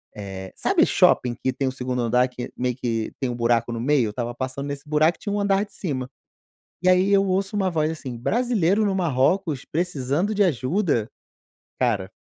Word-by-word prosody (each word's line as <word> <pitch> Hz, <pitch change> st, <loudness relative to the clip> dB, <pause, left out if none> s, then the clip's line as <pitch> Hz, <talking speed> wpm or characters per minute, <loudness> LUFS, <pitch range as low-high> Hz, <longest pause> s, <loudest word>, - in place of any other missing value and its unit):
Eh, 95 Hz, -2 st, -7 dB
sabe -, -, +3 dB
shopping 120 Hz, -1 st, +3 dB
que 130 Hz, -, -2 dB
tem 135 Hz, -, -1 dB
o -, -, 0 dB
2º 125 Hz, -1 st, -3 dB
andar 125 Hz, +2 st, +3 dB
que, 125 Hz, -1 st, -7 dB
meio 125 Hz, -1 st, -1 dB
que 115 Hz, -3 st, -2 dB
tem 130 Hz, -, -1 dB
um 120 Hz, -, -3 dB
buraco 115 Hz, 0 st, +1 dB
no 115 Hz, -, -4 dB
meio? 135 Hz, -3 st, +2 dB
Eu -, -, -2 dB
estava 120 Hz, +2 st, -4 dB
passando 130 Hz, +2 st, -4 dB
nesse 145 Hz, +1 st, -6 dB
buraco 155 Hz, +2 st, +3 dB
e -, -, -48 dB
tinha 205 Hz, -, -3 dB
um 205 Hz, -, 0 dB
andar 200 Hz, 0 st, +2 dB
de 205 Hz, -, -24 dB
cima. 130 Hz, -8 st, -4 dB, 0.7 s
E, 185 Hz, -, +3 dB
aí, 185 Hz, +2 st, +4 dB
eu 195 Hz, 0 st, +4 dB
ouço 195 Hz, +3 st, 0 dB
uma 190 Hz, -2 st, +1 dB
voz 155 Hz, -1 st, 0 dB
assim: 135 Hz, -6 st, -6 dB
"Brasileiro 215 Hz, -, +1 dB
no 195 Hz, -, 0 dB
Marrocos 160 Hz, -1 st, +1 dB
precisando 170 Hz, +3 st, -1 dB
de 205 Hz, -, +3 dB
ajuda?" 140 Hz, -, 0 dB, 0.7 s
Cara, 110 Hz, -6 st, 0 dB
140 Hz, 200 wpm, -23 LUFS, 125-185 Hz, 0.7 s, aí